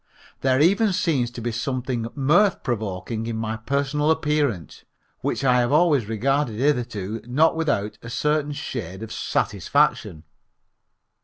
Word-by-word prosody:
There 130 -1 +2
even 195 +6 +3
seems 145 -10 +1
to 120 -1 -8
be 120 +1 -2
something 125 0 -2
mirth 170 +8 +3
provoking 110 -1 -3
in 115 -1 -3
my 110 0 -2
personal 140 +5 -1
appearance, 150 - 0 0.4
which - - -2
I 125 -2 +4
have 120 +1 +1
always 150 -7 +3
regarded 130 +2 0
hitherto 115 -6 -1
not 155 +7 +3
without 110 -10 -1
a 115 - -9
certain 150 +3 0
shade 110 - -6
of 110 - -7
satisfaction. 80 -2 0
130 Hz, 135 wpm, -23 LUFS, 110-150 Hz, 0.4 s, I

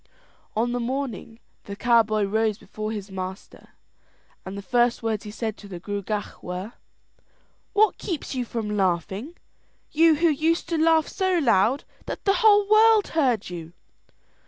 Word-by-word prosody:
On 235 +3 +1
the 245 - -1
morning 245 -2 -4 0.3
the 200 - -6
cowboy 220 -2 +3
rose 215 +1 0
before 215 -1 -6
his 205 -2 -6
master, 190 0 -8 0.7
and 190 +1 -7
the 200 - -7
first 240 +1 +1
words 220 -1 -2
he - - -6
said 220 0 -4
to 205 - -12
the 180 -3 -8
Gruagach 205 +2 -4
were: 185 +5 -6 1.0
"What 425 0 +3
keeps 335 -8 -4
you 255 -2 -1
from 220 -3 -4
laughing, 195 - -1 0.6
you 325 0 +5
who 335 +3 +3
used 320 +3 0
to 335 - 0
laugh 320 -1 +4
so 375 -2 0
loud 245 - +2 0.2
that - - -6
the 395 - +4
whole 415 -2 +5
world 435 0 +5
heard 250 - 0
you?" 170 -1 -8
230 Hz, 155 wpm, -24 LUFS, 205-315 Hz, 1.0 s, you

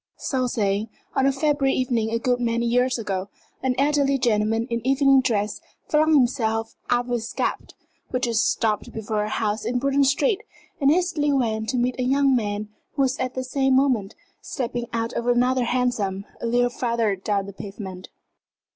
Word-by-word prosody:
So 255 -2 -1
saying 210 -2 0 0.3
on 270 - +3
a - - +4
February 275 -1 +1
evening 240 -4 0
a 230 - 0
good 245 +1 0
many 235 0 0
years 250 +2 +2
ago 195 -3 -3 0.3
an 255 -1 0
elderly 280 0 +2
gentleman 225 -2 +1
in 235 0 -1
evening 270 +1 +4
dress 210 -4 -1 0.3
flung 310 +1 +3
himself 225 -4 +1 0.2
out 245 0 +2
of 245 - -7
his 230 -2 -2
cab, - - -2 0.4
which 255 0 0
had 235 - -1
just 220 - +2
stopped 215 -2 -1
before 215 -1 -2
a 210 - -3
house 215 -1 -1
in 240 +3 -1
Bruton 275 +2 +2
Street, 375 - +2 0.4
and 275 -2 +4
hastily 325 -3 +2
went 220 -5 0
to 255 - 0
meet 250 +1 0
a - - +1
young 270 +1 +3
man 210 -2 -2 0.3
who 275 - +2
was 265 +1 0
at 255 0 -2
the 260 - -2
same 265 0 +1
moment 250 -7 +1 0.3
stepping 240 -3 -4
out 230 +1 -2
of 235 - -3
another 250 +1 +2
hansom 230 -6 -1 0.2
a - - -2
little 245 +1 +2
farther 230 -4 0
down 200 +1 -1
the 200 - -9
pavement. 195 -2 -8
245 Hz, 185 wpm, -24 LUFS, 220-265 Hz, 0.4 s, a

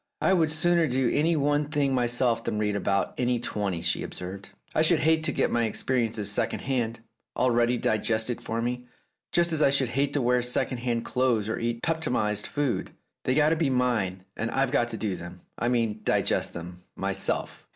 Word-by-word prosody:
"I 190 - +3
would 165 -4 +3
sooner 170 +1 +2
do 130 -1 +1
any 165 +3 +2
one 145 0 +1
thing 145 -3 +1
myself 120 -2 +1
than 105 - -2
read 105 -1 0
about 100 -1 0
any 125 -1 +1
twenty," 100 -7 -3
she 80 - +2
observed. 95 +2 -7 0.2
"I - - +2
should 160 0 +3
hate 160 0 +3
to 150 - +1
get - - 0
my 120 -1 +2
experiences 110 -3 -1
secondhand, 120 +1 -1 0.4
already 120 -1 +2
digested 110 +1 0
for 115 +1 -3
me, 125 +1 -3 0.4
just 170 -1 +3
as 155 - +1
I 140 - +6
should 135 -3 +1
hate 135 +3 0
to 145 - +2
wear 125 +1 +3
second 125 +1 0
hand 120 -1 -1
clothes 125 -5 +1
or 110 - -2
eat 115 0 -2
peptonized 125 -10 0
food. 145 -4 -2 0.3
They've 130 - +2
got 150 0 +5
to 165 - +2
be 160 -3 +1
mine, 115 -8 0
and 115 - -2
I've 135 0 0
got 120 -4 +2
to - - -4
do 105 -4 -2
them 85 +1 -9
— - - -18
I 120 - 0
mean 115 -3 0
digest - - +1
them 90 +1 -8
— - - -51
myself." - - -2
120 Hz, 200 wpm, -27 LUFS, 110-140 Hz, 0.4 s, I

